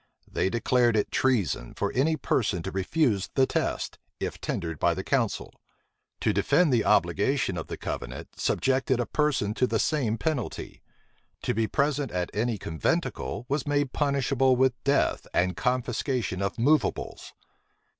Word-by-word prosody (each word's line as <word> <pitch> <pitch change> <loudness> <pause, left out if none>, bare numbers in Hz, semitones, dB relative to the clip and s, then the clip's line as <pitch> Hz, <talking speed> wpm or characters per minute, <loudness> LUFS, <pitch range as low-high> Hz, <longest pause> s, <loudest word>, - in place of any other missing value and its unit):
They - - 0
declared 120 +1 +2
it 105 - 0
treason 100 - 0
for - - -1
any 155 +5 +2
person 105 - 0
to 95 - -4
refuse 100 - +1
the 135 - +5
test, - - -2 0.2
if - - -4
tendered 80 -3 -3
by - - +2
the - - -4
council. - - -1 0.7
To - - +2
defend 175 -7 +3
the 115 - +3
obligation 100 - +2
of - - -5
the - - -5
covenant, 60 +3 -5
subjected 130 -1 +1
a 120 - +1
person 140 -9 0
to 125 +3 +1
the 115 - 0
same 120 -5 +1
penalty. 150 -7 -3 0.6
To - - 0
be 110 +1 +1
present 145 0 0
at 90 -2 -2
any 110 +3 0
conventicle, 100 - -2
was 140 +1 -1
made 145 -2 +1
punishable 140 -2 +2
with 130 0 +3
death 140 +1 +1
and 90 0 +2
confiscation 125 - -1
of 100 +4 -2
movables. 145 +6 0
125 Hz, 150 wpm, -27 LUFS, 100-140 Hz, 0.7 s, the